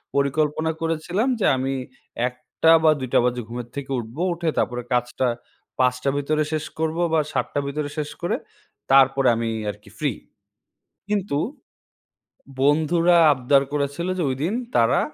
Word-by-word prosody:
পরিকল্পনা 150 +3 +1
করেছিলাম 165 +7 -1
যে 205 - +1
আমি 135 +1 -1 0.6
১:০০ 125 +6 +1
বা 155 - +6
২:০০ 130 -2 +2
বাজে 125 0 0
ঘুমের 120 0 -6
থেকে 140 -1 -5
উঠবো। 120 +7 -7
উঠে 170 -1 -2
তারপরে 125 0 -1
কাজটা 125 +1 0 0.5
৫:০০ 125 +1 +1
র - - -6
ভেতরে 150 +2 +1
শেষ 155 -1 -1
করব 160 0 -1 0.2
বা 160 - +4
৭:০০ 145 - -1
র - - -7
ভেতরে 145 +1 -3
শেষ 150 -1 -2
করে 175 - 0 0.6
তারপরে 135 0 +5
আমি 115 0 -1 0.2
আরকি 105 0 -17
ফ্রি। - - +1 1.0
কিন্তু 200 -8 0 1.3
বন্ধুরা 160 +4 +4 0.2
আবদার 135 +1 +3
করেছিল, 145 +3 -2
যে - - +1
ঐদিন 150 +10 -1 0.2
তারা 115 0 +4
140 Hz, 145 wpm, -23 LUFS, 125-160 Hz, 1.3 s, বা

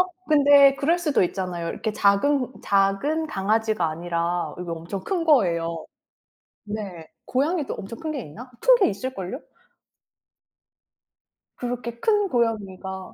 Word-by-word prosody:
어 365 - +4 0.2
근데 285 -2 +6
그럴 325 +5 +1
수도 305 - +1
있잖아요. 180 -2 -3
이렇게 220 - -3
작은 250 +7 +2
작은 200 +12 +1
강아지가 215 - 0
아니라 170 +2 -2
이게 180 -1 -6
엄청 170 +4 -5
큰 355 -4 -1
거예요. 170 - +2 0.8
네. 200 -6 -6 0.2
고양이도 290 +4 0
엄청 225 +4 -8
큰 315 -1 -4
게 280 - -4
있나? 235 - -11
큰 - - +7
게 445 - +3
있을 255 +6 -4
걸요? 195 +4 -5 2.2
그렇게 240 -1 -5
큰 415 -2 +2
고양이가 195 - -2
220 Hz, 265 characters per minute, -24 LUFS, 185-280 Hz, 2.2 s, 큰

